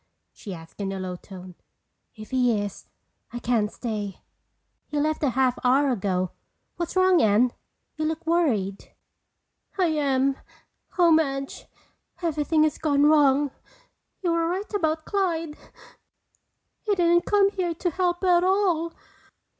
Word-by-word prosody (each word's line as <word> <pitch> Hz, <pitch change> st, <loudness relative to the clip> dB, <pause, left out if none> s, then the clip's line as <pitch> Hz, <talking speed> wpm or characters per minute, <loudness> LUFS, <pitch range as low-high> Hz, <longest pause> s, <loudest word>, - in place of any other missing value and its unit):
she 200 Hz, -, -9 dB
asked 165 Hz, +2 st, -10 dB
in 195 Hz, -1 st, -2 dB
a 195 Hz, -, -4 dB
low 185 Hz, -1 st, -4 dB
tone. 185 Hz, 0 st, -11 dB, 0.6 s
"If 215 Hz, +2 st, -11 dB
he 245 Hz, -4 st, +2 dB
is, 205 Hz, -1 st, -6 dB, 0.4 s
I 240 Hz, -, -6 dB
can't 230 Hz, -3 st, 0 dB
stay." 210 Hz, -5 st, -5 dB, 0.7 s
"He 295 Hz, -, -2 dB
left 310 Hz, +1 st, 0 dB
a 290 Hz, -, +2 dB
half 255 Hz, 0 st, +1 dB
hour 265 Hz, +2 st, +3 dB
ago. 185 Hz, -5 st, -1 dB, 0.5 s
What's 345 Hz, +1 st, -4 dB
wrong, 370 Hz, -2 st, +4 dB
Anne? 220 Hz, +4 st, +3 dB, 0.4 s
You 310 Hz, -, -1 dB
look 320 Hz, +1 st, -3 dB
worried." 240 Hz, -, 0 dB, 0.8 s
"I 370 Hz, -, +3 dB
am. 275 Hz, -3 st, +1 dB, 0.6 s
Oh, 345 Hz, -2 st, +5 dB
Madge, 275 Hz, -4 st, 0 dB, 0.5 s
everything 310 Hz, -2 st, +1 dB
has 310 Hz, -2 st, 0 dB
gone 290 Hz, -2 st, +2 dB
wrong. 290 Hz, -2 st, +4 dB, 0.7 s
You 345 Hz, -, +1 dB
were 335 Hz, 0 st, +1 dB
right 385 Hz, +5 st, -4 dB
about 315 Hz, -5 st, 0 dB
Clyde. 335 Hz, -6 st, -1 dB, 1.3 s
He 420 Hz, -2 st, 0 dB
didn't 345 Hz, -1 st, +3 dB
come 400 Hz, -1 st, +4 dB
here 355 Hz, -4 st, -2 dB
to 355 Hz, +1 st, -2 dB
help 355 Hz, +1 st, -1 dB
at 355 Hz, -1 st, +4 dB
all. 365 Hz, -4 st, +1 dB
300 Hz, 140 wpm, -25 LUFS, 240-345 Hz, 1.3 s, Oh